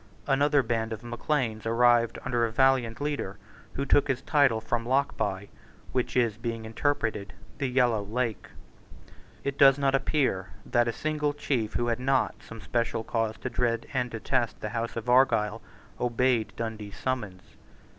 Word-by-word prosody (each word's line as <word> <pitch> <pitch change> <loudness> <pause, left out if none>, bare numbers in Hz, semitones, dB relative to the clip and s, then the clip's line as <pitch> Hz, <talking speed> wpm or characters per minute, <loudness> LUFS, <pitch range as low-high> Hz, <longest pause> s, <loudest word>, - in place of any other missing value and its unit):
Another 145 0 +3
band 115 -1 -1
of 110 +1 -8
Macleans 120 -2 -2
arrived 120 0 +3
under 120 -2 +1
a 115 - 0
valiant 130 -2 +2
leader, 145 -9 -3 0.4
who 140 - -2
took 140 +1 +4
his 130 -3 -1
title 140 -7 +3
from 115 +1 -2
Lochbuy, 120 -6 -1 0.4
which 125 0 -1
is, 115 -4 +2
being 115 -1 -4
interpreted, 110 -4 -1 0.3
the 140 - 0
Yellow 125 -4 +2
Lake, 115 +2 -3 1.0
It 140 -1 -3
does 135 -1 +7
not 140 -1 +1
appear 135 -8 +1 0.2
that 120 0 +2
a - - +1
single 150 +2 -1
chief 125 -7 -2
who 120 - +1
had 120 0 0
not 130 +1 +1
some 115 -1 -11
special 115 -2 -1
cause 115 -1 -1
to 130 - -3
dread 115 -2 0
and 125 -2 0
detest 120 +1 -1
the 105 - -4
House 115 +1 -3
of 115 0 -5
Argyle 115 -4 +3 0.4
obeyed 120 -2 +1
Dundee's 110 -3 -5
summons. 105 -8 -3
120 Hz, 155 wpm, -28 LUFS, 115-135 Hz, 1.0 s, does